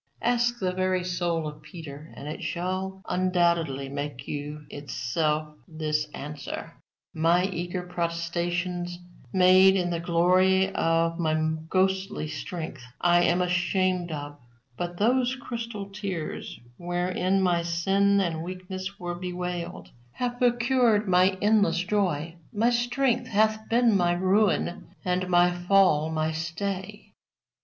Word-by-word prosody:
Ask 240 0 +2
the 185 -4 -1
very 185 0 0
soul 175 -3 -1
of 150 0 -8
Peter, 150 -1 -10
and 140 - -8
it 150 - -5
shall 190 +2 -3
undoubtedly 170 -6 +1
make 140 -1 -5
you 150 +1 -5
itself 150 +3 -2
this 155 -2 -1
answer: 145 0 -7 0.4
My 170 +3 +3
eager 180 -1 -3
protestations, 175 0 -2 0.3
made 185 +1 +6
in 175 -2 0
the 170 - -1
glory 185 +3 +3
of 165 0 +1
my 155 -2 +1 0.3
ghostly 190 -2 0
strength, 160 -2 -6 0.2
I 175 0 +4
am 175 +1 +2
ashamed 180 0 0
of; 145 -1 -6 0.4
but 175 +4 -4
those 250 +4 +2
crystal 230 -6 -6
tears, 195 -6 -5 0.2
wherewith 180 +2 0
my 175 -2 +2
sin 195 +4 +2
and 165 -4 -1
weakness 185 +2 -6
were 175 0 -3
bewailed, 175 - -5 0.2
have 245 -1 -3
procured 240 -3 +3
my 185 +1 +4
endless 205 -5 +3
joy: 175 -4 -1
my 225 +3 +2
strength 245 +1 +1
hath 220 0 +1
been 235 -2 +4
my 175 -2 +3
ruin, 185 0 +1
and 180 0 0
my 175 0 +5
fall 175 -3 +3
my 155 0 0
stay." 185 +5 -4
180 Hz, 125 wpm, -27 LUFS, 165-195 Hz, 0.4 s, made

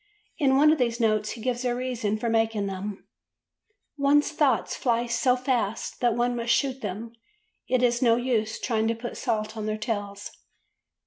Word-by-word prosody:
In 270 -3 +4
one 300 +2 +6
of 315 - +1
these 235 -1 0
notes 215 -2 +1
he 230 - -10
gives 245 +1 -2
a 245 -1 0
reason 240 -4 -2
for 235 - -3
making 225 -2 +1
them: 195 +1 -5 0.9
"One's 290 +2 +3
thoughts 285 -6 +1
fly 240 -2 0
so 245 +1 +2
fast 245 -4 -2
that 240 -2 +2
one 240 +1 +1
must 235 0 +1
shoot 265 0 0
them; 215 +3 -5 0.5
it 255 -1 +1
is 240 0 +2
no 235 -2 +5
use 230 -3 -1
trying 225 -2 0
to 230 - 0
put 240 +1 -6
salt 220 -2 -2
on 215 -1 -4
their 215 0 -1
tails." 205 -2 -4
235 Hz, 180 wpm, -26 LUFS, 215-250 Hz, 0.9 s, one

